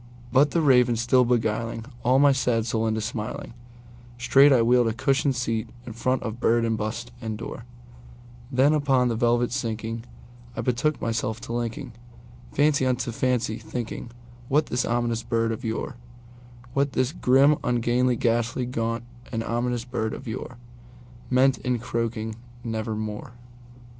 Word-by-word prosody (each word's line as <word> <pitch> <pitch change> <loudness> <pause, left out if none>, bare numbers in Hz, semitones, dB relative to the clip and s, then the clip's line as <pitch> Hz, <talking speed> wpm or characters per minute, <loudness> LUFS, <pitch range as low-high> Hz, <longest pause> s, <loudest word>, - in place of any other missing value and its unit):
'But 140 +4 +5
the 170 - +1
Raven 125 -4 +5
still 120 +3 +3
beguiling 115 -1 -1 0.2
all 125 +2 +4
my 140 0 +6
fancy 115 -4 0
into 110 -1 0
smiling, 110 +1 -5 0.6
Straight 135 +4 +6
I 125 -4 +5
wheeled 120 0 +4
a 110 - 0
cushioned 135 +3 +1
seat 115 -3 -2 0.2
in 115 - -7
front 130 +3 0
of 110 +1 -5
bird 115 -1 +3
and 115 -1 +1
bust 115 +3 -4
and 110 -2 -4
door; 115 +1 -7 0.9
Then, 135 +3 +4
upon 135 -4 +2
the 115 - 0
velvet 120 +1 +2
sinking, 115 -1 -3 0.5
I - - 0
betook 130 +5 0
myself 110 -1 -2
to - - -10
linkingFancy 120 +3 -2
unto 125 -1 -1
fancy, 120 -2 0
thinking 120 -1 -5 0.4
what 150 +4 +2
this 120 0 -1
ominous 120 -1 0
bird 115 -1 0
of 115 +3 -5
yore, 115 +1 -3 0.8
What 140 0 +1
this 130 +1 +1
grim, 140 0 +4
ungainly, 125 +1 +2
ghastly, 115 +2 0
gaunt, 115 -1 -2 0.3
and 115 -2 -2
ominous 120 +1 -1
bird 115 -3 -2
of - - -9
yoreMeant 120 +2 -2
in 125 -1 0
croaking 115 -1 -3 0.3
"Nevermore." 110 -1 -4
120 Hz, 145 wpm, -25 LUFS, 115-125 Hz, 0.9 s, my